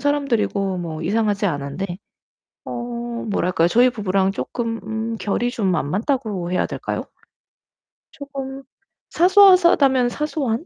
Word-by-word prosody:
사람들이고 235 -10 0
뭐 165 -2 -5
이상하지 210 +2 0
않은데. 175 +4 -4 0.7
어 - - -6 0.6
뭐랄까요? 180 -4 +1
저희 245 +8 +4
부부랑 195 -4 0
쪼끔 230 +1 -3
음 220 +1 -3
결이 225 +3 -1
좀 195 -7 0
안 145 -2 -2
맞다고 210 - -2
해야 180 - +1
될까요? - - -4 1.1
쪼금 275 -1 -7 0.5
사소하다면 345 -9 +5
사소한? 290 -2 -2
225 Hz, 270 characters per minute, -21 LUFS, 190-270 Hz, 1.1 s, 사소하다면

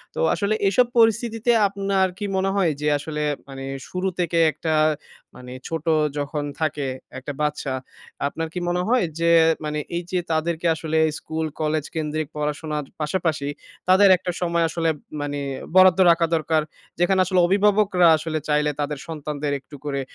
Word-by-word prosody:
তো - - -4
আসলে 200 +1 0
এসব 245 +5 +3
পরিস্থিতিতে 225 +1 +2 0.2
আপনার 195 -1 0
কি 205 - -4
মনে 190 +1 +1
হয় 180 -5 +2
যে 150 - 0
আসলে 150 +1 -5 0.3
মানে 135 0 -7 0.2
শুরু 185 +1 -2
থেকে 170 -1 +1
একটা, 160 0 -2 0.6
মানে 125 0 -11 0.2
ছোট 165 0 -4 0.3
যখন 145 +1 -2 0.2
থাকে 150 -3 -1 0.3
একটা 140 +2 -6
বাচ্চা, 150 -2 -1 0.5
আপনার 165 +2 -4
কি 180 - -3
মনে 180 +1 0
হয় 250 -7 +3
যে 170 0 +3 0.3
মানে 150 0 -2 0.2
এইযে 180 +1 -2
তাদেরকে 160 +1 -1
আসলে 160 0 -2 0.2
স্কুল-কলেজ 155 -1 -2
কেন্দ্রিক 155 -1 -2
পড়াশোনার 150 0 -3 0.2
পাশাপাশি 155 -2 -1 0.4
তাদের 190 +2 +6
একটা 180 0 -4
সময় 170 -1 +1
আসলে 165 0 0 0.3
মানে 145 0 -3 0.4
বরাদ্দ 185 0 +7
রাখা 170 0 +3
দরকার? 160 0 +1 0.4
যেখানে 185 +2 +3
আসলে 185 0 +1
অভিভাবকরা 195 -2 +3
আসলে 155 0 -3
চাইলে 150 0 +2
তাদের 145 0 -2
সন্তানদের 150 -2 -4
একটু 145 +2 -14
করে 140 -1 -2
160 Hz, 150 wpm, -23 LUFS, 150-185 Hz, 0.6 s, বরাদ্দ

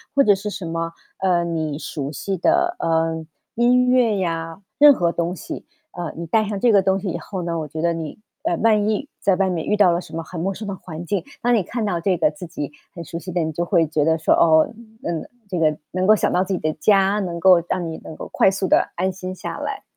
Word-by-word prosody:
或 280 - +6
者 205 -4 +5
是 205 +2 -5
什 190 -3 -6
么， 165 0 -3 0.3
呃， 180 -2 +2
你 160 -3 -2
熟 145 -3 -5
悉 195 +5 -3
的， 350 - +2
呃， 160 0 0 0.3
音 250 +2 +4
乐 240 -5 +3
呀， 165 -1 -3 0.2
任 290 -1 +9
何 170 -7 +1
东 170 +2 -2
西。 - - -7 0.3
呃， 175 -2 -5
你 170 - -5
带 215 +6 +2
上 205 -1 -3
这 240 +1 +4
个 200 -2 +5
东 190 +1 +1
西 195 - -3
以 170 - -2
后 185 +3 -6
呢， 170 -1 -2
我 155 - -4
觉 155 +2 -5
得 170 - +2
你， 160 -2 -6 0.3
哎， 175 - +1
万 215 -2 +3
一 220 +7 -1
在 195 -2 +2
外 190 0 +1
面 170 -3 -2
遇 210 - +2
到 200 -4 +5
了 170 - +1
什 160 - -11
么 165 - -3
很 170 +1 -8
陌 195 +4 -1
生 215 +3 -7
的 200 - -3
环 170 -2 -8
境， 200 +2 -1 0.2
当 245 0 +2
你 210 -5 +3
看 235 +5 -4
到 175 -4 -1
这 185 +1 +1
个 150 - +2
自 170 +4 -9
己 150 -4 -5 0.2
很 170 - -6
熟 165 +1 -6
悉 180 - -9
的 175 - +1
你 160 0 -1
就 170 +3 -2
会 170 -3 +3
觉 150 -1 0
得 160 0 +3
说， 155 - +3
哦， 160 -1 +5 0.4
嗯， 170 -2 -3 0.2
这 180 -3 -2
个 155 -2 +2
能 185 +1 0
够 215 - +7
想 - - 0
到 180 - +2
自 195 - -2
己 185 - -1
的 155 0 0
家， 195 +3 +3
能 175 -4 -3
够 185 -2 +7
让 180 -2 -1
你 160 - -6
能 155 - -8
够 - - -7
快 - - +5
速 190 0 -1
地 - - +3
安 185 +2 0
心 185 0 -6
下 - - -6
来。 - - -4
180 Hz, 280 characters per minute, -22 LUFS, 165-200 Hz, 0.4 s, 任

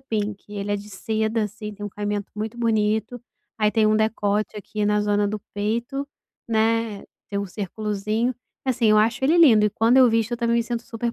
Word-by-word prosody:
pink. 210 -6 -3
Ele 205 0 -3
é - - +1
de 205 +1 -9
seda, 220 +2 -1
assim, 210 +1 -7
tem 205 0 -8
um - - -3
caimento 205 0 -4
muito 215 +2 -4
bonito, 220 +1 0 0.4
aí 210 -1 +3
tem 220 0 +3
um 215 0 +3
decote 215 -1 0
aqui 210 +1 -3
na 210 0 +2
zona 205 0 +1
do 215 +1 -3 0.2
peito, 235 +7 -2 0.4
né, 225 -1 +1 0.3
tem 200 - -2
um 200 - -2
circulozinho. 210 +4 -2 0.3
Assim, 250 -3 +1
eu 215 - +6
acho 225 +4 +1
ele 310 +6 +4
lindo 235 -11 +7
e - - 0
quando 225 +5 +3
eu 255 -2 +7
visto 225 +1 +1
eu - - 0
também 235 0 +1
me 235 - +2
sinto 235 0 -4
super 230 0 -4
215 Hz, 205 wpm, -23 LUFS, 210-230 Hz, 0.4 s, lindo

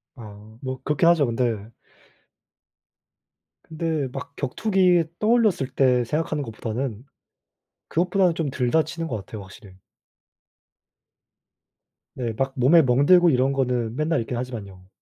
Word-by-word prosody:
아 110 -2 -13
뭐 130 -1 -5
그렇긴 150 +2 +1
하죠. 165 -4 +4
근데 115 -3 -2 1.9
근데 160 -3 -3
막 140 +1 -8
격투기 180 - +2 0.2
떠올렸을 215 - +2
때 125 -2 +3
생각하는 150 +3 -2
것보다는 115 0 -5 0.8
그것보다는 180 0 +1
좀 160 -5 -2
덜 125 -2 -1
다치는 165 +1 0
것 120 - -3
같아요. 105 +1 -9
확실히. 95 0 -14 2.4
네 120 -3 -3
막 135 0 -1
몸에 140 +7 +6
멍들고 145 +7 +5
이런 135 -1 +2
거는 125 -4 -1
맨날 155 +3 0
있긴 120 +2 -5
하지만요. 100 -7 -7
135 Hz, 255 characters per minute, -23 LUFS, 115-165 Hz, 2.4 s, 몸에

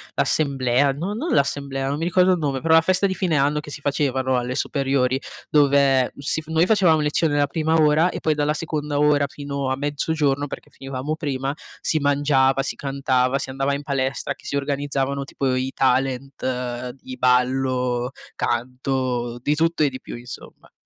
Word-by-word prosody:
l'assemblea, 135 -2 +2
no 175 +9 -4
non 300 +11 -2
l'assemblea, 140 -1 0
non 145 +2 -2
mi - - -2
ricordo 180 +1 +4
il 180 - +1
nome, 140 -3 -1
però 160 0 +3
la 165 - +7
festa 185 +3 +2
di 190 - +1
fine 175 -5 0
anno 145 +2 +2
che 150 - -9
si 145 - -7
facevano 130 -3 0
alle 125 +1 -3
superiori, 135 -2 0 0.3
dove 140 -3 +4
si 140 +3 -2
f 155 - -21
noi 160 +1 +3
facevamo 185 -6 +4
lezione 150 0 +1
la 145 - +4
prima 160 +2 0
ora 155 +3 +4
e - - -5
poi 155 - +1
dalla 150 +1 0
seconda 150 -2 -3
ora 145 -1 +3
fino 140 -2 -4
a 130 - -1
mezzogiorno, 145 0 0
perché - - -9
finivamo 135 +3 -4
prima, 135 -2 -2 0.3
si 155 - 0
mangiava, 140 -2 +2
si - - -3
cantava, 135 -1 0
si 130 - -4
andava 135 +1 0
in 140 - -5
palestra, 135 0 -2
che 140 +1 -22
si - - -3
organizzavano 140 -1 -1
tipo 135 -2 -1
i 130 +1 -1
talent 130 -1 -1
di 130 - -8
ballo, 125 -1 +1 0.3
canto, 125 0 -2
di 145 - +2
tutto 165 +1 +1
e 145 - +3
di 130 - -8
più - - -8
insomma. 120 0 -11
140 Hz, 180 wpm, -22 LUFS, 130-150 Hz, 0.3 s, la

